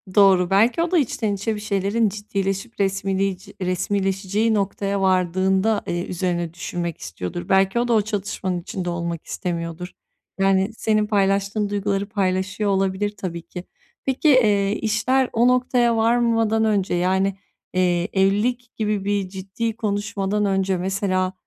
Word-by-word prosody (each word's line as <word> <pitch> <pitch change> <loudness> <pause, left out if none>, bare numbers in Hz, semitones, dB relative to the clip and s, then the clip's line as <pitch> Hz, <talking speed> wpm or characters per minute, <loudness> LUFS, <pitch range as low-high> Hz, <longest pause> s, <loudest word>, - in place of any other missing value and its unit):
Doğru, 190 -3 +5
belki 225 +10 +3
o 340 - -1
da 365 - +4
içten 225 -7 0
içe 205 +3 -2
bir - - -6
şeylerin 205 +2 0
ciddileşip 200 +2 -4
resmiliyci 195 -1 -1
resmileşeceği 195 +3 0
noktaya 200 -1 -1
vardığında, 190 +3 +2
eee, 175 +1 -2
üzerine 175 -2 -2
düşünmek 170 -1 -4
istiyordur. 90 - -6
Belki 195 +4 +3
o 245 - 0
da 235 - +2
o 220 - +4
çatışmanın 200 -3 -3
içinde 180 +1 -4
olmak 170 -1 -4
istemiyordur. 170 0 -4 0.5
Yani, 195 +1 +2
senin 215 -1 +1
paylaştığın 200 0 +1
duyguları 200 0 -1
paylaşıyor 200 +1 -1
olabilir, 195 +1 0
tabii 175 -3 -5
ki. 180 +1 -9 0.4
Peki, 270 +3 +2
eee, 210 -7 +4
işler 250 +4 +1
o 235 +2 +4
noktaya 250 -2 +2
varmadan 225 -1 +2
önce, 205 -4 +1
yani, 190 +2 +1 0.4
eee, 180 -1 +1
evlilik 215 +6 +1
gibi 210 -3 -1
bir 200 -2 0
ciddi 195 +4 -4
konuşmadan 205 -1 -1
önce, 195 -1 +1
mesela, 185 0 -1
195 Hz, 135 wpm, -22 LUFS, 185-215 Hz, 0.5 s, Doğru